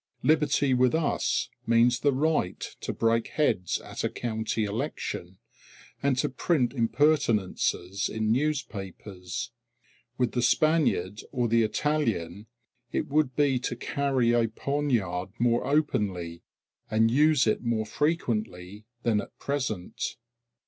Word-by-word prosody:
Liberty 145 Hz, -3 st, +3 dB
with 125 Hz, +2 st, +3 dB
us 160 Hz, -2 st, 0 dB, 0.2 s
means 115 Hz, +1 st, +4 dB
the 145 Hz, +3 st, +3 dB
right 140 Hz, -, 0 dB, 0.2 s
to -, -, -3 dB
break 115 Hz, 0 st, +1 dB
heads 95 Hz, -, 0 dB
at -, -, -6 dB
a -, -, +1 dB
county 110 Hz, -1 st, -2 dB
election, 95 Hz, -3 st, -4 dB, 0.6 s
and 140 Hz, -2 st, +1 dB
to -, -, +1 dB
print 135 Hz, -1 st, 0 dB
impertinences 115 Hz, -, +1 dB
in 110 Hz, -1 st, -1 dB
newspapers. 100 Hz, -, -3 dB, 0.7 s
With 125 Hz, -2 st, +1 dB
the 125 Hz, -, 0 dB
Spaniard 125 Hz, -, +2 dB
or 125 Hz, -3 st, 0 dB
the 115 Hz, +1 st, +3 dB
Italian 110 Hz, -, -1 dB, 0.4 s
it -, -, -2 dB
would 145 Hz, -3 st, +1 dB
be 140 Hz, -3 st, +2 dB
to 125 Hz, -1 st, -3 dB
carry 130 Hz, -1 st, 0 dB
a 120 Hz, -1 st, +3 dB
poniard 115 Hz, -8 st, -1 dB
more 120 Hz, +1 st, +1 dB
openly, 100 Hz, -, 0 dB, 0.5 s
and 110 Hz, +1 st, +3 dB
use 150 Hz, +1 st, +4 dB
it 110 Hz, -, +1 dB
more 115 Hz, -2 st, -1 dB
frequently 110 Hz, -, -2 dB, 0.2 s
than 110 Hz, -3 st, +2 dB
at -, -, -13 dB
present. 125 Hz, -10 st, -3 dB
120 Hz, 120 wpm, -27 LUFS, 105-140 Hz, 0.7 s, means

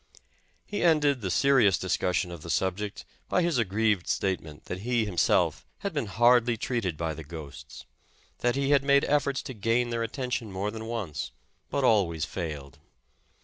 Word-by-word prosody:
He 205 Hz, -, -4 dB
ended 150 Hz, -6 st, +3 dB
the 95 Hz, -, -2 dB
serious 110 Hz, -2 st, +4 dB
discussion 90 Hz, 0 st, 0 dB
of 85 Hz, -3 st, -8 dB
the 85 Hz, -, -9 dB
subject 95 Hz, +4 st, -2 dB, 0.2 s
by 180 Hz, -, +2 dB
his 170 Hz, -7 st, +1 dB
aggrieved 105 Hz, -2 st, +1 dB
statement, 80 Hz, -6 st, -2 dB
that 90 Hz, -, -5 dB
he, 120 Hz, +1 st, 0 dB
himself, 95 Hz, -5 st, +2 dB, 0.2 s
had 200 Hz, -3 st, -3 dB
been 145 Hz, -7 st, -2 dB
hardly 120 Hz, +3 st, +4 dB
treated 110 Hz, -9 st, -2 dB
by 80 Hz, -1 st, -2 dB
the 80 Hz, -, -8 dB
ghosts; 75 Hz, -2 st, -10 dB, 0.5 s
that 120 Hz, 0 st, +1 dB
he 140 Hz, 0 st, 0 dB
had 140 Hz, -2 st, +5 dB
made 140 Hz, 0 st, +4 dB
efforts 140 Hz, -2 st, +1 dB
to 130 Hz, -, -6 dB
gain 115 Hz, +3 st, 0 dB
their 115 Hz, 0 st, -1 dB
at 115 Hz, -1 st, -2 dB
tention 125 Hz, -5 st, -3 dB
more 95 Hz, +3 st, -2 dB
than 110 Hz, 0 st, -7 dB
once, 105 Hz, -, -4 dB, 0.4 s
but 140 Hz, -, -1 dB
always 95 Hz, -, +3 dB
failed. 75 Hz, -6 st, -6 dB
110 Hz, 170 wpm, -28 LUFS, 90-125 Hz, 0.5 s, had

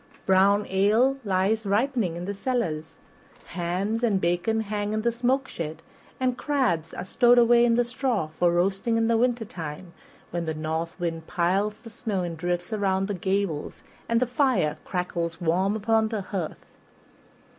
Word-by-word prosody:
Brown 200 Hz, +2 st, +4 dB
ale 215 Hz, +8 st, +3 dB
lies 200 Hz, +2 st, +1 dB
ripening 210 Hz, -2 st, 0 dB
in 175 Hz, -, -5 dB
the 200 Hz, -, -3 dB
cellar, 205 Hz, -8 st, -1 dB, 0.6 s
hams 185 Hz, +6 st, -2 dB
and 215 Hz, -5 st, +2 dB
bacon 175 Hz, +6 st, +1 dB
hang 210 Hz, 0 st, -2 dB
in 215 Hz, 0 st, -1 dB
the 235 Hz, -, +2 dB
smoke 255 Hz, +3 st, 0 dB
shed, 160 Hz, -1 st, -6 dB, 0.4 s
and 255 Hz, -1 st, 0 dB
crabs 255 Hz, -, 0 dB
are 180 Hz, -, -6 dB
stowed 240 Hz, +5 st, +4 dB
away 240 Hz, 0 st, +6 dB
in 235 Hz, -1 st, +4 dB
the 245 Hz, -, +3 dB
straw 240 Hz, -, -1 dB
for 170 Hz, +3 st, +1 dB
roasting 195 Hz, +6 st, +1 dB
in 225 Hz, 0 st, +2 dB
the 230 Hz, -, +3 dB
wintertime, 195 Hz, -9 st, -2 dB, 0.4 s
when 170 Hz, 0 st, -2 dB
the 160 Hz, -1 st, -2 dB
north 160 Hz, +3 st, -3 dB
wind 165 Hz, -2 st, -3 dB
piles 195 Hz, +3 st, 0 dB
the 230 Hz, -, -10 dB
snow 215 Hz, -5 st, -2 dB
in 170 Hz, -1 st, -4 dB
drifts 175 Hz, +3 st, -2 dB
around 195 Hz, -2 st, +1 dB
the 205 Hz, -, -2 dB
gables 190 Hz, -4 st, -2 dB, 0.3 s
and 230 Hz, 0 st, +3 dB
the 255 Hz, -, +2 dB
fire 240 Hz, -, +1 dB
crackles 170 Hz, -2 st, -3 dB
warm 185 Hz, +5 st, +1 dB
upon 220 Hz, +1 st, +2 dB
the 220 Hz, -2 st, -3 dB
hearth. 185 Hz, -4 st, -5 dB
200 Hz, 165 wpm, -26 LUFS, 175-230 Hz, 0.6 s, away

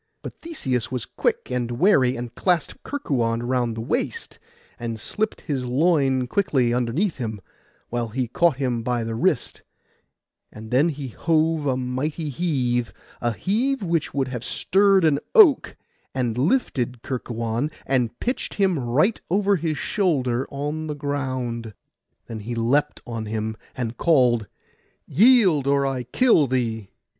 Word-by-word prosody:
But -, -, -9 dB
Theseus 130 Hz, -, -3 dB
was 125 Hz, -3 st, -3 dB
quick -, -, -2 dB
and 125 Hz, -1 st, -1 dB
wary, 130 Hz, -3 st, +3 dB
and 120 Hz, 0 st, -6 dB
clasped 175 Hz, -5 st, 0 dB
Kerkuon 120 Hz, -, -1 dB
round 120 Hz, -2 st, 0 dB
the -, -, -3 dB
waist, 115 Hz, -, -3 dB, 0.4 s
and 115 Hz, -1 st, -4 dB
slipped 215 Hz, -, -2 dB
his 135 Hz, -6 st, -3 dB
loin 135 Hz, -2 st, +2 dB
quickly 130 Hz, -6 st, +1 dB
underneath 125 Hz, -, 0 dB
him, 110 Hz, -5 st, -4 dB, 0.5 s
while 120 Hz, -1 st, -2 dB
he 125 Hz, +3 st, -2 dB
caught 170 Hz, +4 st, +2 dB
him 125 Hz, -4 st, -1 dB
by 120 Hz, 0 st, -1 dB
the 115 Hz, 0 st, -3 dB
wrist; 115 Hz, -, 0 dB, 0.9 s
and 110 Hz, +1 st, -10 dB
then 140 Hz, +7 st, +4 dB
he 140 Hz, -4 st, -5 dB
hove 160 Hz, +3 st, +1 dB
a 130 Hz, -2 st, +1 dB
mighty 135 Hz, +5 st, -3 dB
heave, 125 Hz, -7 st, -1 dB, 0.3 s
a 120 Hz, -, +1 dB
heave 230 Hz, -, 0 dB
which 165 Hz, -4 st, 0 dB
would 135 Hz, -2 st, -1 dB
have 125 Hz, -2 st, -5 dB
stirred 195 Hz, +5 st, +3 dB
an 145 Hz, -3 st, +3 dB, 0.2 s
oak, 380 Hz, -, +6 dB, 0.4 s
and 120 Hz, -4 st, 0 dB
lifted 125 Hz, -, 0 dB
Kerkuon, 120 Hz, +1 st, -2 dB, 0.2 s
and 120 Hz, -3 st, 0 dB
pitched 250 Hz, +2 st, -3 dB
him 190 Hz, -6 st, +2 dB
right 135 Hz, -, +1 dB
over 200 Hz, +1 st, +2 dB
his 160 Hz, -2 st, -2 dB
shoulder 135 Hz, -, 0 dB
on 150 Hz, +3 st, -4 dB
the 150 Hz, -, -3 dB
ground. 130 Hz, -6 st, -3 dB, 0.5 s
Then 115 Hz, -1 st, -7 dB
he 115 Hz, +3 st, -5 dB
leapt 135 Hz, +6 st, +1 dB
on 115 Hz, -2 st, -5 dB
him, 110 Hz, 0 st, -3 dB, 0.2 s
and 120 Hz, -2 st, -3 dB
called, 125 Hz, -9 st, +3 dB, 0.6 s
'Yield, 190 Hz, -, +5 dB
or 140 Hz, 0 st, +3 dB
I 135 Hz, -2 st, -1 dB
kill 155 Hz, -, +3 dB
thee! 115 Hz, -5 st, -2 dB
130 Hz, 145 wpm, -23 LUFS, 120-160 Hz, 0.9 s, oak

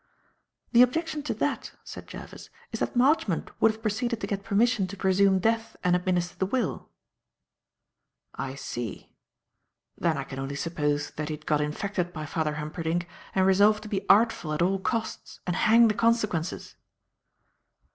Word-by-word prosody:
"The 240 Hz, -, +7 dB
objection 310 Hz, +5 st, +2 dB
to -, -, +2 dB
that," -, -, -2 dB
said -, -, -9 dB
Jervis, -, -, -10 dB, 0.2 s
"is -, -, -4 dB
that -, -, -2 dB
Marchmont 245 Hz, -, +2 dB
would 225 Hz, -, +6 dB
have 220 Hz, 0 st, -13 dB
proceeded 230 Hz, +2 st, -1 dB
to -, -, -3 dB
get 200 Hz, -1 st, -3 dB
permission 215 Hz, 0 st, +2 dB
to 200 Hz, +2 st, -8 dB
presume 190 Hz, 0 st, +3 dB
death 225 Hz, +3 st, 0 dB
and 180 Hz, 0 st, +3 dB
administer 180 Hz, 0 st, 0 dB
the 190 Hz, -, +1 dB
will." 240 Hz, -1 st, -2 dB, 1.4 s
"I 135 Hz, 0 st, -5 dB
see. 120 Hz, -4 st, -6 dB, 0.8 s
Then 165 Hz, -4 st, 0 dB
I 140 Hz, -, -2 dB
can 135 Hz, 0 st, -8 dB
only 135 Hz, +1 st, -4 dB
suppose 150 Hz, -2 st, -1 dB
that 155 Hz, 0 st, -3 dB
he 155 Hz, -, -2 dB
had 150 Hz, 0 st, -17 dB
got 150 Hz, -1 st, +2 dB
infected 175 Hz, +4 st, -2 dB
by 155 Hz, -1 st, -5 dB
Father 150 Hz, 0 st, -1 dB
Humperdinck 160 Hz, +3 st, -2 dB, 0.3 s
and 190 Hz, -1 st, +4 dB
resolved 205 Hz, +3 st, +4 dB
to 215 Hz, -, -8 dB
be 200 Hz, -1 st, -3 dB
artful 205 Hz, -7 st, +4 dB
at 155 Hz, -, +1 dB
all 190 Hz, +2 st, +1 dB
costs 225 Hz, +3 st, -3 dB
and 180 Hz, -, -1 dB
hang 230 Hz, +4 st, +6 dB
the 215 Hz, -, +2 dB
consequences." 210 Hz, -6 st, 0 dB
190 Hz, 165 wpm, -27 LUFS, 160-220 Hz, 1.4 s, The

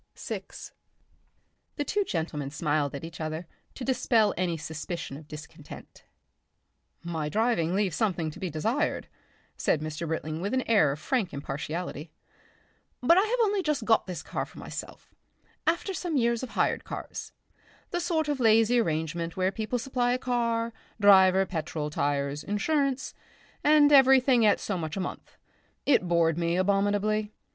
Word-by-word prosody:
Section -, -, -5 dB
6 -, -, -10 dB, 1.0 s
The 290 Hz, -, -1 dB
two 410 Hz, +8 st, 0 dB
gentlemen 160 Hz, -, -3 dB
smiled 145 Hz, -1 st, -1 dB
at 140 Hz, -, -7 dB
each 165 Hz, 0 st, -8 dB
other 155 Hz, +2 st, -4 dB, 0.3 s
to 265 Hz, -, -6 dB
dispel 235 Hz, -5 st, +2 dB
any 175 Hz, -1 st, -1 dB
suspicion 160 Hz, -1 st, -5 dB
of 150 Hz, +1 st, -11 dB
discontent. 155 Hz, 0 st, -11 dB, 1.0 s
"My 160 Hz, -3 st, -3 dB
driving 205 Hz, -5 st, +1 dB
leaves 195 Hz, -5 st, 0 dB
something 175 Hz, -7 st, 0 dB
to -, -, -12 dB
be 185 Hz, -, -3 dB
desired," 225 Hz, -, -1 dB, 0.5 s
said 155 Hz, -, +1 dB
Mr. 155 Hz, +2 st, -4 dB
Britling 160 Hz, 0 st, -3 dB
with 200 Hz, +7 st, -1 dB
an 260 Hz, -, +1 dB
air 200 Hz, -11 st, +4 dB
of 140 Hz, -, -4 dB
frank 215 Hz, -, -1 dB
impartiality. 150 Hz, +3 st, -5 dB, 0.9 s
"But 335 Hz, +8 st, +6 dB
I -, -, +5 dB
have 450 Hz, +4 st, 0 dB
only 410 Hz, -2 st, +1 dB
just 300 Hz, -9 st, -1 dB
got 225 Hz, -3 st, +3 dB
this 175 Hz, -4 st, -5 dB
car -, -, -3 dB
for -, -, -13 dB
myself -, -, -8 dB, 0.5 s
after 340 Hz, +4 st, +1 dB
some 340 Hz, -3 st, -2 dB
years 235 Hz, -2 st, +1 dB
of 260 Hz, -, -5 dB
hired -, -, +1 dB
cars -, -, -7 dB, 0.6 s
the 350 Hz, -, -1 dB
sort 330 Hz, -3 st, 0 dB
of 290 Hz, -2 st, -1 dB
lazy 225 Hz, +1 st, +4 dB
arrangement 165 Hz, -2 st, -2 dB
where 185 Hz, 0 st, +1 dB
people 220 Hz, +4 st, -2 dB
supply 245 Hz, 0 st, 0 dB
car, 235 Hz, -2 st, -1 dB, 0.3 s
driver, 190 Hz, -2 st, +6 dB
petrol, 155 Hz, -4 st, -4 dB
tyres, 140 Hz, 0 st, -1 dB
insurance 270 Hz, +6 st, 0 dB, 0.5 s
and 295 Hz, -1 st, +6 dB
everything 265 Hz, -4 st, +6 dB
at 205 Hz, -, +4 dB
so 195 Hz, -4 st, -3 dB
much 160 Hz, +2 st, -4 dB
a -, -, -1 dB
month. 185 Hz, -, -6 dB, 0.5 s
It 250 Hz, -10 st, +3 dB
bored 170 Hz, -1 st, +2 dB
me 170 Hz, 0 st, +1 dB
abominably. 205 Hz, +2 st, +1 dB
195 Hz, 155 wpm, -28 LUFS, 160-250 Hz, 1.0 s, But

